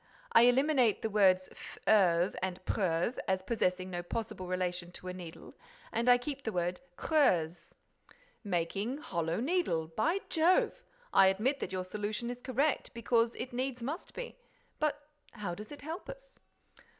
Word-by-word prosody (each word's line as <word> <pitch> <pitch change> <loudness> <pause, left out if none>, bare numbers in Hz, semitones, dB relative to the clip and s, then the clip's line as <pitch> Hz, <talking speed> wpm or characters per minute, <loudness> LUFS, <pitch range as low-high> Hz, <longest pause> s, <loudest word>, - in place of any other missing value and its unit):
I 230 - +7
eliminate 255 -3 +3
the 220 - -1
words 185 -3 +4
fleuve 180 -4 +2
and 185 -1 -2
preuve, 180 +3 0
as 190 0 +1
possessing 185 -4 0
no 175 -1 -3
possible 185 0 -5
relation 180 -1 -2
to 185 - -7
a - - -4
needle, 175 -3 -10 0.4
and 235 +2 +1
I 245 - +8
keep 275 +3 -5
the 220 - -2
word 180 -1 -1 0.2
creuse." 175 - +1 0.7
"Making 200 +6 -1
'hollow 170 - -2
needle'! 240 - 0
By 325 - 0
jove! 335 +3 +3 0.3
I 190 - +7
admit 225 +9 +1
that - - -4
your 185 -1 -2
solution 210 +5 -3
is 245 0 -8
correct, 270 +1 0
because 230 0 +2
it 250 +1 -6
needs 250 -1 -2
must 300 +9 -5
be; - - -6 0.4
but 295 -1 -1 0.3
how 205 -6 -4
does 210 +7 -9
it 290 - -9
help 325 +9 -6
us?" - - -11
215 Hz, 155 wpm, -32 LUFS, 180-265 Hz, 0.7 s, I